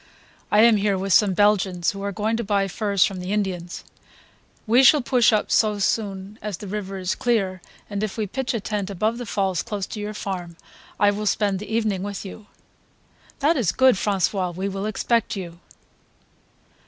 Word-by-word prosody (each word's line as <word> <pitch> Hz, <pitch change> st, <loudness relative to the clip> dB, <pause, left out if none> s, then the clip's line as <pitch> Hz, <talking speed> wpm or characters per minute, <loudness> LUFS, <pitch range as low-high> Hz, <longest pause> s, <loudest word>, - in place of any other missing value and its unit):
I 210 Hz, -, +5 dB
am 230 Hz, -1 st, +6 dB
here 200 Hz, -1 st, +1 dB
with 195 Hz, 0 st, -1 dB
some 200 Hz, -3 st, +4 dB
Belgians 195 Hz, -4 st, +2 dB
who 195 Hz, -, -8 dB
are 200 Hz, 0 st, -2 dB
going 215 Hz, +3 st, -1 dB
to 235 Hz, -, -2 dB
buy 200 Hz, -1 st, +1 dB
furs 200 Hz, 0 st, +1 dB
from 190 Hz, -2 st, -4 dB
the 180 Hz, +1 st, -5 dB
Indians; 185 Hz, -4 st, -3 dB, 0.8 s
we 235 Hz, +4 st, +5 dB
shall 285 Hz, 0 st, +6 dB
push 245 Hz, -1 st, +4 dB
up 215 Hz, -1 st, 0 dB
so 215 Hz, -2 st, +3 dB
soon 200 Hz, 0 st, -2 dB
as 210 Hz, -4 st, -4 dB
the -, -, -9 dB
river 195 Hz, -1 st, -5 dB
is 185 Hz, -1 st, -1 dB
clear, 195 Hz, -6 st, 0 dB, 0.3 s
and 205 Hz, -1 st, -4 dB
if 215 Hz, 0 st, -3 dB
we 215 Hz, -, -1 dB
pitch 250 Hz, +5 st, -3 dB
a -, -, 0 dB
tent 205 Hz, -1 st, -3 dB
above 215 Hz, +5 st, -1 dB
the 245 Hz, -, -6 dB
falls 190 Hz, -4 st, 0 dB
close 205 Hz, -4 st, -4 dB
to 215 Hz, -, -7 dB
your 210 Hz, +1 st, -5 dB
farm 180 Hz, -4 st, -5 dB, 0.4 s
I 205 Hz, 0 st, +5 dB
will 210 Hz, +1 st, -3 dB
spend 200 Hz, -1 st, +1 dB
the 210 Hz, +1 st, -8 dB
evening 215 Hz, -4 st, 0 dB
with 200 Hz, 0 st, -5 dB
you." 205 Hz, +2 st, -10 dB, 0.9 s
"That 305 Hz, +4 st, +3 dB
is 215 Hz, -10 st, +1 dB
good, 260 Hz, +3 st, +5 dB
François, 190 Hz, -2 st, -1 dB
we 190 Hz, +2 st, -2 dB
will 195 Hz, +1 st, -3 dB
expect 230 Hz, +2 st, 0 dB
you." 170 Hz, -3 st, -7 dB
205 Hz, 190 wpm, -23 LUFS, 190-215 Hz, 0.9 s, am